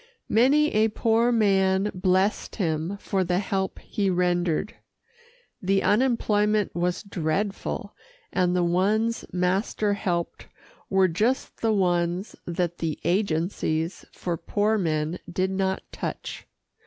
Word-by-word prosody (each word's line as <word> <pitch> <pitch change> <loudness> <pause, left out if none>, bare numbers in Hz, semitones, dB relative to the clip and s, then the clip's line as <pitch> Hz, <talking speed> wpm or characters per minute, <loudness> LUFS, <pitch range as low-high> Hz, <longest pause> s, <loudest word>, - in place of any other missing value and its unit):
Many 280 +7 +4
a 215 +1 +4
poor 225 +2 +2
man 195 -3 +3
blessed 185 +2 +1
him 165 0 -1
for 195 -2 0
the 180 0 0
help 190 0 -1
he 200 -2 -2
rendered. 180 +1 0 0.9
The 195 +1 +1
unemployment 210 -3 +2
was 175 +2 -1
dreadful, 195 +1 -2 0.4
and 180 -1 +2
the 180 - +2
ones 210 +7 +1
master 190 +3 0
helped 175 -4 -3 0.4
were 190 -1 +4
just 220 +10 -1
the 225 - +2
ones 180 -1 0
that 175 0 -2
the 160 -2 -2
agencies 170 -2 0
for 175 -2 -3
poor 210 +5 0
men 160 -1 -1
did 185 +2 0
not 190 0 -1
touch. - - -6
190 Hz, 115 wpm, -25 LUFS, 175-210 Hz, 0.9 s, Many